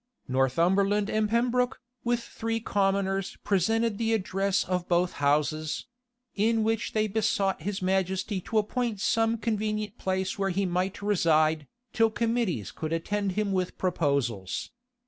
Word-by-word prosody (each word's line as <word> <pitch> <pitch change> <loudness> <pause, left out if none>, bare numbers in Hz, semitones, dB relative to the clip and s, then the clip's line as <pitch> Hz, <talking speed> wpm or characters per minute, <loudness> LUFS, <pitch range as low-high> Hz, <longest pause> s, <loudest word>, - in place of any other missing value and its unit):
Northumberland 185 +11 +2
and 215 -1 +1
Pembroke, 245 +2 +1 0.2
with 240 0 0
three 225 0 -3
commoners, 195 -2 0
presented 220 +3 +1
the 225 -1 +1
address 195 -1 +1
of 180 -1 -2
both 175 0 +2
houses; 150 +2 +1 0.5
in 220 +2 +2
which 225 0 -1
they 215 0 +2
besought 200 -3 0
his 195 +2 -3
majesty 190 +1 0
to 220 - -2
appoint 220 0 0
some 225 +3 +2
convenient 215 -1 -2
place 190 +1 -1
where 195 0 +1
he 195 +2 0
might 185 +3 -1
reside, 160 -6 +2 0.3
till 225 -1 +4
committees 225 - -1
could 155 0 -5
attend 195 +4 -1
him 210 0 0
with 185 -2 -1
proposals. 140 - -1
195 Hz, 135 wpm, -28 LUFS, 180-220 Hz, 0.5 s, till